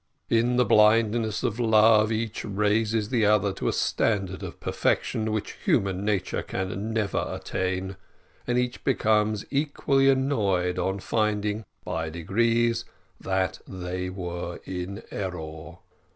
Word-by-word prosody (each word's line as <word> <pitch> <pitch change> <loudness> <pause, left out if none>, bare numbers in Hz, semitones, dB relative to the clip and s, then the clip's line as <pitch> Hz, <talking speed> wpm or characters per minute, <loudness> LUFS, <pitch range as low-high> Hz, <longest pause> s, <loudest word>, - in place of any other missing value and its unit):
In 120 +2 +3
the 125 0 +4
blindness 110 +1 +3
of 115 +2 -1
love, 110 -1 +5
each 110 0 -2
raises 105 +1 +1
the 120 -4 +1
other 105 -2 +3
to - - -4
a - - +3
standard 95 -4 0
of - - -7
perfection 110 0 0
which 110 -1 -3
human 95 -1 +1
nature 100 -3 -1
can 95 +3 -4
never 110 -4 0
attain, 95 +1 -3 0.5
and 120 0 +1
each 125 0 -1
becomes 110 -4 +1
equally 140 -1 +2
annoyed 100 -10 +1
on 95 +1 0
finding, 105 0 -1 0.2
by 80 -3 -3
degrees, 115 +8 +1 0.4
that 95 -1 -1
they 90 0 -4
were 90 -2 -5
in 95 +2 -5
error. 80 -5 -6
105 Hz, 125 wpm, -26 LUFS, 95-115 Hz, 0.5 s, love